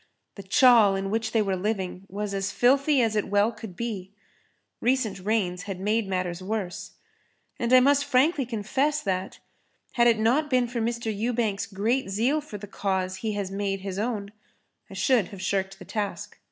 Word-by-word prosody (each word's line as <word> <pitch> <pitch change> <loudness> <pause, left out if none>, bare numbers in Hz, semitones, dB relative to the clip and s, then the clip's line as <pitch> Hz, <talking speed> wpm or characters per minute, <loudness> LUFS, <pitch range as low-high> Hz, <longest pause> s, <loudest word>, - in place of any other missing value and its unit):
The 200 - -9
chawl 225 -1 +5
in 195 0 -3
which 225 0 -1
they 220 -2 +2
were 195 -2 -1
living 190 -1 -3
was 205 +1 -4
as 195 -1 -2
filthy 275 +3 +3
as 220 -1 0
it 210 - 0
well 205 +2 +2
could 215 -4 -10
be. 200 -5 -5 0.7
Recent 245 -6 0
rains 185 -3 -1
had 190 -2 -4
made 210 +2 0
matters 180 -2 -2
worse. 195 -2 -4 0.7
And 235 0 -1
I 255 0 +8
must 280 +2 +4
frankly 285 +2 +2
confess 260 +7 0
that, 190 -1 -2 0.5
had 240 -1 +3
it 230 -2 +4
not 250 +8 +2
been 250 -2 +2
for 235 -1 -3
Mr. 230 -1 -2
Ewbank's 225 -2 -1
great 215 +4 -1
zeal 240 +10 +1
for 250 -8 -8
the 205 - -8
cause 190 -2 -2
he 215 +2 -3
has 200 -2 -3
made 195 -1 -2
his 195 0 -4
own, 210 -3 -3 0.6
I 195 - -10
should 215 0 +2
have 200 - -10
shirked 195 0 -2
the 185 - -12
task. 205 -2 -4
210 Hz, 180 wpm, -26 LUFS, 195-240 Hz, 0.7 s, I